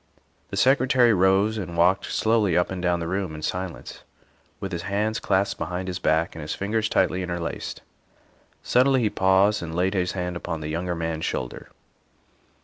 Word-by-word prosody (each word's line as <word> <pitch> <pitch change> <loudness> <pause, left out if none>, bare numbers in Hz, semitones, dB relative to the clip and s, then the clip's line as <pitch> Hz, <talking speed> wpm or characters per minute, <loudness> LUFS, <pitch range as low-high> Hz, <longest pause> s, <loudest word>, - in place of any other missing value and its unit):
The 100 - -5
Secretary 125 +1 +4
rose 100 +3 +3
and 85 -3 -6
walked 90 +3 +3
slowly 110 -6 +2
up 90 - +1
and 95 -1 -4
down 90 -1 +1
the 85 - -3
room 95 -3 -2
in 75 - -8
silence, 90 +1 -5 0.6
with 95 - -5
his 85 -2 -3
hands 105 +3 -1
clasped 100 0 0
behind 90 +1 -3
his 90 -1 -3
back 80 +2 +1
and 80 - -8
his 75 +1 -4
fingers 110 +2 -1
tightly 90 - +1
interlaced. 85 -2 -4 0.8
Suddenly 130 +1 +3
he 105 -3 +1
paused 95 +2 +3
and 80 -1 -6
laid 90 +3 +1
his 90 -2 0
hand 90 -1 -3
upon 85 -2 -4
the 75 - -4
younger 85 +2 -2
man's 80 -1 -3
shoulder. 60 -1 -4
95 Hz, 175 wpm, -24 LUFS, 85-100 Hz, 0.8 s, Secretary